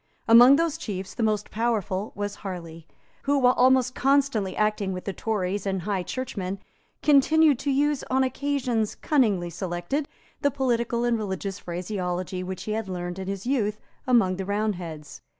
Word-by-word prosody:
Among 240 +4 +9
those 325 0 0
chiefs 195 - -5
the - - -5
most 215 -2 0
powerful 215 -3 -1
was 205 0 -3
Harley, 170 -4 -8 0.4
who, 285 +1 +3
while 250 -2 +5
almost 255 0 +4
constantly 270 -9 +1
acting 210 -2 0
with 180 - -6
the 195 - -3
Tories 200 -1 -2
and 190 -2 -1
High 200 -1 -1
Churchmen, 200 -4 -4 0.5
continued 300 -1 +5
to 285 - -2
use, 285 +1 +1
on 265 +1 +3
occasions 255 -5 -1
cunningly 205 - +1
selected, 175 - -3 0.3
the 285 - +3
political 240 -3 0
and 240 -2 +1
religious 195 -1 -4
phraseology 180 0 -3
which 185 0 -5
he 215 - -4
had 215 -2 -2
learned 175 0 -4
in 190 - -5
his 195 +1 -4
youth 215 -5 0 0.3
among 225 -8 +3
the 190 - -4
Roundheads. 185 -7 -3
210 Hz, 160 wpm, -25 LUFS, 185-255 Hz, 0.5 s, Among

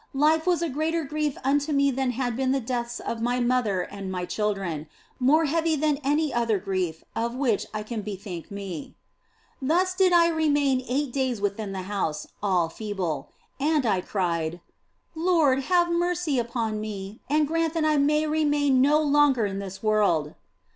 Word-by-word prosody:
Life 315 +3 +3
was 345 -2 +2
a - - +1
greater 315 +4 -1
grief 300 0 -2
unto 285 +3 +1
me 280 -1 +3
than 265 0 -1
had 245 -1 -2
been 260 +1 0
the 275 - +1
deaths 240 -1 -3
of 230 - -4
my 245 +2 0
mother 240 -6 +1
and 195 0 -6
my 180 -1 -3
children, 195 -7 -2 0.3
more 300 +6 +4
heavy 325 +2 +1
than 300 -1 +1
any 295 +2 +1
other 230 -3 +1
grief 185 -4 -3
of 235 +2 -1
which 255 -6 0
I 215 -1 -4
can 220 0 -4
bethink 195 -4 -7
me. 195 -6 -7 0.7
Thus 350 +7 +2
did 370 -1 +3
I 340 -1 +6
remain 290 -5 +2
eight 270 0 -1
days 260 -5 0
within 205 0 -2
the 190 -1 -4
house, 180 -6 -2 0.2
all 185 -5 +2
feeble. 175 -6 -4 0.3
And 295 -1 +2
I 195 -5 +2
cried, 170 -4 -2 0.3
" - - -48 0.2
Lord, 320 -5 +3
have 350 -1 +3
mercy 345 -5 0
upon 230 -3 -2
me 205 -1 -6
and 300 +1 +3
grant 330 +1 0
that 320 -1 +1
I 305 -1 +3
may 300 +2 +3
remain 290 -3 +2
no 295 +3 +4
longer 285 -5 +4
in 195 -1 -3
this 195 0 -7
world." 200 -9 +2
255 Hz, 175 wpm, -26 LUFS, 200-300 Hz, 0.7 s, I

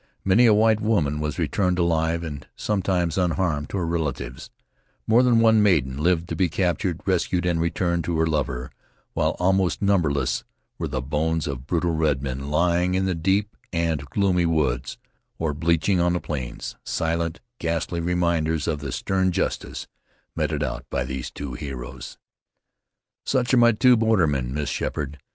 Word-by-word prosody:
Many 105 +6 +5
a 110 - +6
white 110 0 +3
woman 80 -10 +1
was 75 0 -3
returned 90 +3 0
alive 85 -1 +1
and, 75 -4 -7
sometimes, 95 -4 0
unharmed 85 -4 0
to - - -3
her 90 - -1
relatives; 75 -6 -3 0.6
more 115 +3 +5
than 125 -2 +4
one 110 -1 +5
maiden 75 -11 +2
lived 85 0 +2
to - - -2
be 95 -2 +1
captured, 90 0 -1
rescued, 90 -1 +1
and 85 -2 +1
returned 85 0 0
to 85 -2 -1
her 80 - +3
lover, 70 -5 -2 0.4
while - - 0
almost 95 0 +2
numberless 70 -11 +1 0.4
were - - -2
the 65 -3 -3
bones 80 +3 -1
of 70 -2 -5
brutal 85 +1 0
redmen 70 -4 -1
lying 90 +3 +2
in 95 0 +1
the 95 - +1
deep 95 +5 0 0.2
and 80 -4 -1
gloomy 90 0 +1
woods, 75 -8 0 0.4
or 80 -2 -1
bleaching 85 +5 +1
on 85 0 +2
the 90 - 0
plains, 65 -8 -5
silent, 85 0 -1 0.2
ghastly 85 +1 -2
reminders 85 -3 0
of 75 -3 -1
the 70 -3 -5
stern 95 +4 0
justice - - -2 0.5
meted - - -1
out 65 0 -3
by - - -1
these 65 -1 -5
two 70 -3 -7
heroes. 65 -1 -7 1.1
"Such 130 -1 0
are - - +6
my 120 -1 +6
two 125 +3 +5
bordermen, 85 - +2
Miss 75 +1 -2
Sheppard. 75 0 -3
85 Hz, 160 wpm, -24 LUFS, 75-95 Hz, 1.1 s, a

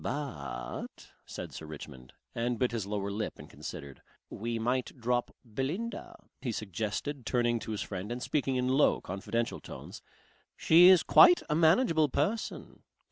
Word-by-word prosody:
"But," 70 - -5 0.2
said - - -7
Sir 80 - -8
Richmond 70 -4 -10 0.2
and 120 +1 -1
bit 125 0 +1
his 110 -4 -3
lower 100 -1 -2
lip 105 +2 -4
and - - -11
considered. 75 -1 -9 0.3
"We 115 +2 -3
might 125 +3 -2
drop 120 +1 0 0.2
Belinda," 145 - -4 0.3
he 130 -3 -2
suggested 110 - -4
turning 120 -1 +1
to 110 - -6
his 105 - -2
friend 100 +2 -6
and 120 - -3
speaking 135 -3 0
in 125 0 0
low, 135 +3 +3
confidential 115 +5 -3
tones. - - -10 0.6
"She 170 +3 +7
is 185 -3 +7
quite 355 -1 +7
a - - +3
manageable 160 - +4
person. 200 - -2
120 Hz, 150 wpm, -30 LUFS, 100-145 Hz, 0.6 s, She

